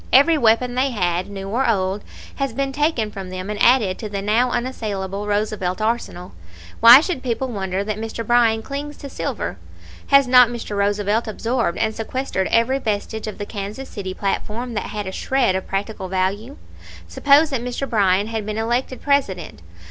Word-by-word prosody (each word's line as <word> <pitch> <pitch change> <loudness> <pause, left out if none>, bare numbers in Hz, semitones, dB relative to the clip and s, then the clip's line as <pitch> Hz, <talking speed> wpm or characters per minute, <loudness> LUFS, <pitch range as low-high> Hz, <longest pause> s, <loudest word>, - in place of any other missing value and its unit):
Every 285 +5 +6
weapon 245 -2 +3
they 260 +2 +1
had, 180 -6 -1
new 195 -1 -6
or 240 +4 +1
old, 195 -1 0 0.3
has 275 -4 -2
been 275 +2 -1
taken 285 -7 0
from 195 -2 -7
them 185 +2 -5
and 210 - -5
added 230 -7 +4
to 215 - -5
the 200 -1 -3
now 225 +5 +2
unassailable 210 -5 -3
Roosevelt 205 -3 -1
arsenal. 215 -5 -2 0.5
Why 235 +4 +10
should 335 -5 -3
people 255 +1 -2
wonder 190 -3 -2
that 215 0 -4
Mr. 225 +1 -5
Bryan 230 -1 +3
clings 285 +3 -6
to 280 - -9
silver? - - -4 0.5
Has 275 -1 +5
not 250 -1 +7
Mr. 235 -3 -5
Roosevelt 205 +2 0
absorbed 230 -2 -1
and 220 -1 0
sequestered 225 -3 -2
every 230 +4 +2
vestige 220 -1 -3
of 215 - -6
the 205 - -5
Kansas 210 +6 -6
City 190 -3 -6
platform 220 +4 -3
that 210 - -3
had 210 -1 -5
a 190 - -4
shred 255 0 +1
of 190 - -3
practical 195 0 -3
value? 195 +8 -2 0.5
Suppose 290 +2 +4
that 265 -4 -1
Mr. 250 +3 -3
Bryan 200 -4 +2
had 220 -1 -3
been 215 +1 -4
elected 240 +3 -2
President. 230 - -1
220 Hz, 180 wpm, -21 LUFS, 200-250 Hz, 0.5 s, Why